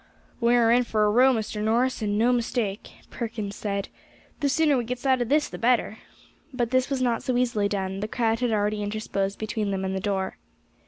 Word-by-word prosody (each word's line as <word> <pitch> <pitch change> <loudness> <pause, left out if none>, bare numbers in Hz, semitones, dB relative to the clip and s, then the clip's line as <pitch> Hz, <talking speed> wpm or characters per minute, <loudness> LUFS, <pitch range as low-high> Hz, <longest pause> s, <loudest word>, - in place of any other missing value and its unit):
"We 235 0 +3
are 230 -1 +4
in 245 +1 +4
for 215 -3 +1
a 210 - +3
row, 255 +4 +5
Mr. 215 -3 -2
Norris, 240 +4 +1
and 205 -1 0
no 240 +3 +3
mistake," 230 -4 -2 0.2
Perkins 220 -4 -5
said; 200 -2 -3 0.5
"the 285 -2 +1
sooner 300 0 +3
we 245 - 0
gets 245 +3 -5
out 260 -2 +3
of 240 - -2
this 295 +1 +3
the - - -9
better." 230 -2 +1 0.5
But 245 -3 -2
this 255 0 +2
was 270 -2 -1
not 240 -2 +1
so 255 -1 -1
easily 225 -5 +1
done; 195 -1 -3
the 210 - -3
crowd 225 0 0
had 245 -2 0
already 210 0 0
interposed 205 -1 -2
between 215 -1 -2
them 190 -1 -2
and 190 0 -2
the - - -1
door. 190 -1 -2
225 Hz, 215 wpm, -25 LUFS, 205-250 Hz, 0.5 s, row